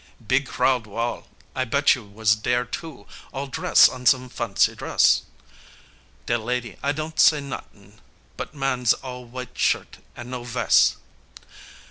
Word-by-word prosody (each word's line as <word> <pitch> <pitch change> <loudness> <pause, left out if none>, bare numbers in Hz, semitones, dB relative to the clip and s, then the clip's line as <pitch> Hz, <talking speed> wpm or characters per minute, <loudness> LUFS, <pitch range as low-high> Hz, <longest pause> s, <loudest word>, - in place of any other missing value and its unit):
Beeg 130 +3 +2
crowd, 125 -4 +1
wall! 115 +3 -4 0.3
I 130 - 0
bet 140 +4 +3
you 125 - -6
was 105 +1 +1
dere 120 +3 0
too, 145 -3 -8 0.3
all 140 +1 -4
dress 135 - +5
on 125 -1 -5
some 130 0 +3
fancy 115 -5 +1
dress, - - +3 1.0
De 120 - 0
lady, 120 +2 -3
I 140 - 0
don't 155 +2 -5
say 155 -2 +6
not'ing, 105 -7 -10 0.4
but - - -7
man's 130 -4 +1
all 125 -1 -9
w'ite 125 0 -8
shirt - - -1 0.2
an' 120 +1 -9
no 125 -1 -5
ves'. 120 -2 +3
125 Hz, 145 wpm, -23 LUFS, 115-135 Hz, 1.0 s, say